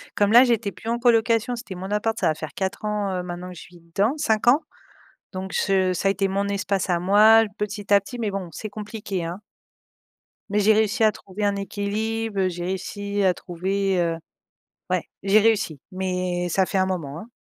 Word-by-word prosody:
comme 205 0 +2
là 240 +2 +9
j'étais 230 -5 +1
plus 225 - -7
en 235 +1 0
colocation, 235 0 +2
c'était 235 -5 -8
mon 185 +2 -6
appart 220 +2 0
ça 180 - +2
va 160 - +3
faire 155 -1 -7
4 190 +1 -3
ans, 210 -2 -1
heu, 180 - -3
maintenant 175 0 -6
que 180 - -9
je - - -10
suis 175 0 -15
dedans 185 +7 0
5 220 -7 0
ans 270 +5 +6 0.7
donc 190 +1 -5
se 190 -2 +2
ça 190 - -1
a - - +4
été 195 0 0
mon 200 +1 -1
espace 200 -1 -1
à 175 -1 +2
moi, 215 +4 +6
petit 205 0 -2
à 200 - +8
petit 240 +5 -9
mais 215 -3 -1
bon 195 -2 -4
c'est 215 - -6
compliqué, 205 -3 -5
hein. 175 +4 -6 1.1
Mais 205 +1 +1
j'ai 210 +2 +5
réussi 220 +2 +2
à 215 - +6
trouver 200 0 -8
un 200 -1 +1
équilibe, 205 +1 -2
j'ai 175 -1 -4
réussi 200 +2 -3
à 185 -1 +4
trouver, 190 +2 -1
heu 170 -1 +1 0.7
ouais, - - +1 0.2
j'ai 200 +2 +5
réussi, 205 -10 +1
mais 180 -1 -2
ça 185 +2 +2
fait 195 - -2
un 190 - +3
moment, 165 -6 -4
hein. 220 - -11
200 Hz, 205 wpm, -24 LUFS, 185-215 Hz, 1.1 s, là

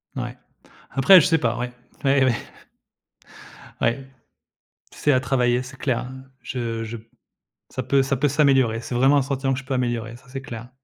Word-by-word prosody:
N - - -2
ouais. - - -7 0.5
Après 140 +8 +7
je - - +2
sais 165 -2 +3
pas, 120 -5 0
ouais. 125 0 -3 0.3
Ouais, 135 -1 +4
ouais. 120 -4 +2 1.4
Ouais, 130 +3 0 0.8
c'est 145 - +1
à 130 - +3
travailler, 125 -1 +1
c'est 130 +2 -11
clair, 130 -4 0
hein. 130 +1 -9 0.2
Je 115 -3 -3
je 115 +1 -6
p 110 - -17 0.7
ça 130 - -4
peut 135 +1 +3
ça 135 0 -1
peut 145 +4 +2
s'améliorer. 135 -6 +3
C'est 120 - -5
vraiment 135 +4 +4
un 140 - +4
sentiment 135 0 -1
que 130 - -2
je 135 - -12
peux 130 - -3
améliorer, 120 -2 -2
ça 135 - -22
c'est 135 +1 -6
clair. 120 -3 -8
130 Hz, 195 wpm, -23 LUFS, 120-135 Hz, 1.4 s, Après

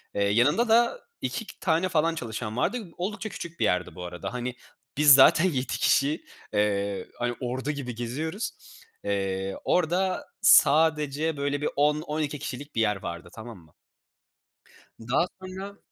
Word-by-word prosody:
Eee, 100 - +1
yanında 145 - +3
da 240 - +3 0.2
2 225 - -5
tane 170 +1 +1
falan 165 0 +1
çalışan 115 -3 -5
vardı. 200 - -1
Oldukça 205 +4 -4
küçük 170 -2 -8
bir - - +2
yerdi 90 0 0
bu 90 - -7
arada. 90 +5 -6
Hani, 125 0 -4 0.4
biz 145 -2 +8
zaten 155 +5 +6
7 130 -8 0
kişi, 145 +3 +1 0.3
eee, 100 -1 0
hani, 120 0 -1
ordu 130 +3 -2
gibi 130 -5 -5
geziyoruz. 155 - -3 0.5
Eee, 95 -1 -2
orada 180 +2 +1
sadece 150 0 +4
böyle 145 0 -1
bir - - 0
10-12 150 0 0
kişilik 145 0 -7
bir 115 - +2
yer 105 -1 +2
vardı, 85 0 -6
tamam 110 -1 -9
mı? 80 -2 -22 1.3
Daha 125 +10 +1 0.2
sonra 190 +2 -8
145 Hz, 145 wpm, -26 LUFS, 115-165 Hz, 1.3 s, biz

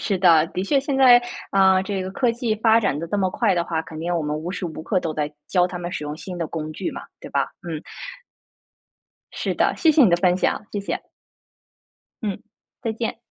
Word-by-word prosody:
是 195 -3 -1
的。 165 -4 +5
的 185 - -3
确 275 +8 +2
现 275 0 -2
在， 250 -2 +8 0.3
啊， 190 -1 +4
这 195 0 -3
个 185 - -5
科 245 +4 +1
技 235 -2 -1
发 225 +1 +4
展 170 -9 0
得 170 - -4
这 185 - -2
么 190 -2 +1
快 205 -1 +1
的 170 -1 0
话， 165 -2 -1
肯 160 -1 -10
定 175 +2 -2
我 165 - 0
们 150 0 -2
无 160 +3 -5
时 180 -1 -4
无 160 -1 -7
刻 185 +2 0
都 160 -3 -3
在 150 -1 -2 0.2
教 180 -2 +3
他 180 0 -6
们 175 0 -5
使 150 - -4
用 150 0 -5
新 180 +2 -7
的 165 - -1
工 155 -1 -5
具 - - -3
嘛， - - -7 0.2
对 - - -10
吧？ - - 0 0.2
嗯。 160 -2 -4 1.5
是 - - -2
的， - - +2
谢 325 - +4
谢 305 -1 +5
你 215 - +6
的 170 - +5
分 180 0 +3
享， 195 - -1
谢 205 - -2
谢。 200 - -4 1.2
嗯， 205 0 -3 0.4
再 225 - -1
见。 225 +1 -4
185 Hz, 245 characters per minute, -23 LUFS, 165-215 Hz, 1.5 s, 在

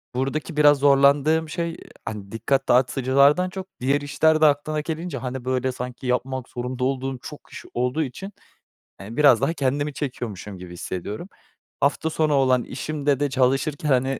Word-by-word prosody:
buradaki 145 +5 -2
biraz 145 -1 +6
zorlandığım 145 +3 +4
şey, 170 +1 -3 0.3
hani, 100 -2 -6
dikkat 115 +5 0
dağıtıcılardan 135 +7 +4
çok, 190 +1 -7
diğer 140 +3 +1
işler 155 +2 +2
de - - +7
aklına 150 +1 +2
gelince, 160 -1 -4
hani, 125 0 -5
böyle, 130 0 0
sanki 125 +1 -6
yapmak 125 +1 -2
zorunda 125 +1 -4
olduğum 135 0 -1
çok 150 +4 -9
iş - - -9
olduğu 125 +6 0
için, 195 +9 -7 0.7
eee, 105 +4 -9
biraz 140 -6 +6
daha 165 - +1
kendimi 145 0 -1
çekiyormuşum 110 - -5
gibi 90 -1 -10
hissediyorum. 95 - -6 0.5
Hafta 145 +3 +1
sonu 155 -1 +1
olan 130 -3 +3
işimde 140 +1 -2
de, 145 0 +1
çalışırken 135 +3 +1
hani, 130 -1 +3
ııı, 135 - -2
135 Hz, 160 wpm, -23 LUFS, 125-150 Hz, 0.7 s, de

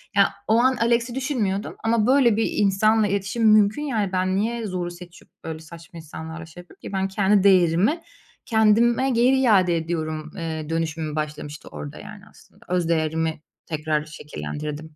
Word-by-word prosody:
Ya, 200 -1 +4
o 220 - +3
an 260 +2 +3
Alex'i 235 +1 +1
düşünmüyordum 230 -8 -2
ama, 225 -1 +2
böyle 255 -4 +4
bir 225 - +1
insanla 210 +2 +2
iletişim 205 +3 +1
mümkün, 215 +4 +4
yani. 220 -9 -1
Ben 185 0 0
niye 230 +2 -1
zoru 180 -2 -3
seçip, 175 0 -13
öyle 160 -1 -6
saçma 165 +1 -13
insanlarla 160 +1 -8
şey 165 +2 -12
yapayım 175 - -20
ki? - - -8
Ben 190 0 0
kendi 195 0 +2
değerimi 190 - +4 0.4
kendime 230 +3 +3
geri 250 +3 +3
iade 190 -8 +4
ediyorum, 155 -2 -4
eee, 160 -3 -5
dönüşümüm 160 -2 -2
başlamıştı 150 -1 -5
orada, 75 -1 -8
yani, - - -11
aslında. - - -21
Öz 175 -2 0
değerimi 160 -1 0 0.3
tekrar 155 -1 -1
şekillendirdim. 150 - -7
185 Hz, 155 wpm, -23 LUFS, 160-220 Hz, 0.4 s, Ya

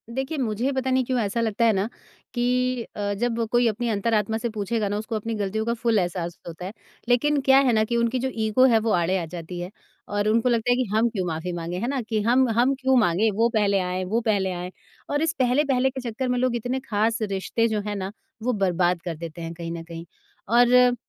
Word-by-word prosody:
देखिए, 270 +4 -2
मुझे 240 +2 -1
पता 265 -1 -1
नहीं 260 0 +3
क्यों 255 -1 0
ऐसा 220 +2 -1
लगता 230 +1 +1
है? 225 - +5
ना 195 +3 0 0.5
कि 240 -1 -1 0.5
अ, 205 -1 -2
जब 230 +2 -1
कोई 240 -1 +4
अपनी 230 +2 -1
अंतरात्मा 220 +1 0
से 235 +1 -2
पूछेगा 215 0 -2
ना 205 - -1
उसको 220 +1 -4
अपनी 225 +2 -3
ग़लतियों 210 +2 -2
का 235 - +1
फुल 230 -2 +1
एहसास 175 -1 -2
तो - - -8
होता 170 +2 -8
है। 195 - -6 0.4
लेकिन, 290 +4 +3
क्या 265 0 +5
है 240 - +3
ना 215 0 +3
कि 235 +1 -1
उनकी 235 +2 +1
जो 260 +1 -1
ईगो 220 +4 +4
है 225 - +5
वो - - +2
आड़े 180 +2 +2
आ 170 - -2
जाती 175 +1 -6
है 175 +1 -5 0.4
और 205 +1 -1
उनको 230 +3 +3
लगता 235 +1 +1
है - - +4
कि 255 - +1
हम 230 +2 +3
क्यों 190 -5 -3
माफ़ी 165 +2 -3
माँगे 170 +1 -4
है 235 - -2
ना 270 -2 -1
कि 215 -2 +1
हम 250 +4 +3
हम 265 +3 +4
क्यों 265 0 +1
माँगे 215 +1 +3
वो 230 +2 +3
पहले 200 -2 +3
आएँ, 180 0 -2
वो 220 +6 0
पहले 200 -4 +1
आएँ 180 +1 -5 0.4
और 290 +1 0
इस 320 - +1
पहले-पहले 260 0 +2
के 265 -1 -6
चक्कर 255 +4 -3
में 250 - +1
लोग 255 -1 +1
इतने 245 +3 -2
ख़ास 225 +2 +1
रिश्ते 205 +3 0
जो 215 -2 -1
हैं 205 - -2
ना 195 0 -4 0.3
वो 250 - +1
बर्बाद 175 -1 +1
कर 170 -2 -3
देते 170 +1 -7
हैं 165 0 -5
कहीं 170 0 -6
न 165 -1 -5
कहीं। 165 0 -9 0.4
और 245 +1 +5
220 Hz, 240 wpm, -24 LUFS, 190-245 Hz, 0.5 s, है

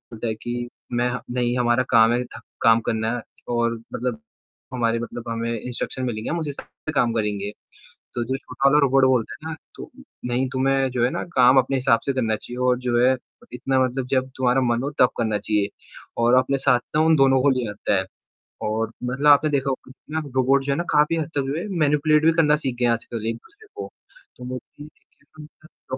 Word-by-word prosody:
बोलता 115 +2 -4
है 110 - 0
कि 120 +1 -5 0.2
मैं 120 +1 +1 0.3
नहीं 120 0 0
हमारा 120 +1 +2
काम 115 -2 +5
है 125 - 0
थका 125 - -11 0.2
काम 115 0 +5
करना 110 0 0
है 120 - -4 0.3
और 115 0 +1 0.2
मतलब 125 - -3 0.5
हमारे 115 -2 0
मतलब 120 0 -6
हमें 115 0 -2
इंस्ट्रक्शंस 125 +2 -4
मिलेंगे। 110 -2 -4
हम 170 - -1
उस 160 - -4
हिसाब 140 - -7 0.2
से - - 0
काम 120 -5 +2
करेंगे। 105 -2 -2 0.6
तो 120 - -1
जो 130 +3 -2
छोटा 135 +1 -1
वाला 150 - +4
रोबोट 135 -1 +4
बोलते 125 -4 +1
है 160 - -4
ना, 160 - -5 0.2
तो - - -9 0.4
नहीं, 125 +2 0
तुम्हे 135 0 +1
जो 125 -2 0
है - - +2
ना - - -3
काम 125 +1 +6
अपने 135 +1 0
हिसाब 125 -3 +3
से 140 - 0
करना 115 -4 0
चाहिए 120 - -9
और 125 -1 +3
जो 125 -1 0
है 130 +2 +4 0.4
इतना 130 +2 0
मतलब 130 0 -2
जब 130 0 0
तुम्हारा 130 0 +2
मन 120 0 +1
हो 145 - -2
तब 125 - +6
करना 110 -3 0
चाहिए 105 0 0 0.5
और 120 +1 +4
अपने 135 +1 0
साथ 130 -2 +3 0.2
ना - - +4
उन 160 - +5
दोनों 135 -1 +4
को 140 - +5
ले 125 -4 -1
आता 105 - -1
है। 95 - -3 0.6
और 110 +1 -1
मतलब 130 +4 0
आपने 145 +2 +5
देखा 140 -1 0
होगा 135 +4 -5 0.2
रोबोट 135 +1 +3
जो 140 - 0
है 140 - -2
ना 170 - 0
काफ़ी 150 +2 +3
हद 160 -2 -2
तक 140 - +2
जो 140 - -2
है 195 - -5
मैनिपुलेट 150 +1 +3
भी 165 - +6
करना 150 -2 +4
सीख 130 -2 -1
गए 120 - +2
हैं 120 - +4
आजकल 115 -1 -5
एक-दूसरे 410 - -8
को। - - -6 0.5
तो 125 - -9
वो 130 0 -4 0.8
तो 150 -3 -10
125 Hz, 215 wpm, -23 LUFS, 115-135 Hz, 0.8 s, काम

